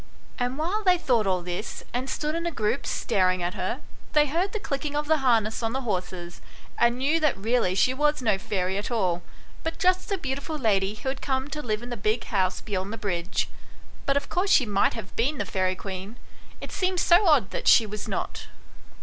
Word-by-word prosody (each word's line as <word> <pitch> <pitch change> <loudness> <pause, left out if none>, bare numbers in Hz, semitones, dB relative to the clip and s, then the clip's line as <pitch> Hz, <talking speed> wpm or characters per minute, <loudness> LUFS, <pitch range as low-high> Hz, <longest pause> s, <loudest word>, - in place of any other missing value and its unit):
And 245 +2 -1
while 365 +8 -1
they 365 -2 +5
thought 240 - +2
all 185 -2 +1
this, 180 +4 -5
and 255 +2 -2
stood 300 +2 -2
in 335 +1 -2
a - - -1
group 225 -1 -1
staring 185 -4 +1
at 175 +1 -1
her, - - -3 0.3
they 300 -1 +5
heard 340 +7 0
the 435 - -3
clicking 285 -3 -3
of 295 0 0
the 315 +1 +3
harness 225 -4 +2
on 225 0 -1
the 265 - -1
horses, 180 -6 -4 0.4
and 235 +1 +4
knew 290 +6 +2
that 305 -9 +2
really 220 -2 +1
she 255 +6 +3
was 295 +2 +2
no 215 -6 +1
fairy 190 0 -1
at 205 - -4
all, 185 -7 0 0.4
but 325 - -3
just 370 0 +2
the 395 - 0
beautiful 280 0 -3
lady 205 -5 +1
who 265 - -3
had 265 - -4
come 265 0 -1
to 300 - -3
live 220 -3 -2
in 245 - -7
the 240 - -3
big 215 +3 0
house 185 -3 0
beyond 195 -1 -3
the 225 - -5
bridge; 180 -4 -1 0.6
but 275 0 +3
of 280 - -2
course 370 +3 0
she 265 - +6
might 200 -2 +2
have 215 -4 -8
been 275 +6 +1
the 205 - -1
fairy 185 -1 0
queen 190 +3 -6 0.5
it - - -7
seemed 370 -1 0
so 360 +4 +5
odd 275 - +4
that - - -4
she 225 - +7
was 210 0 -6
not. - - -4
240 Hz, 220 wpm, -26 LUFS, 195-295 Hz, 0.6 s, she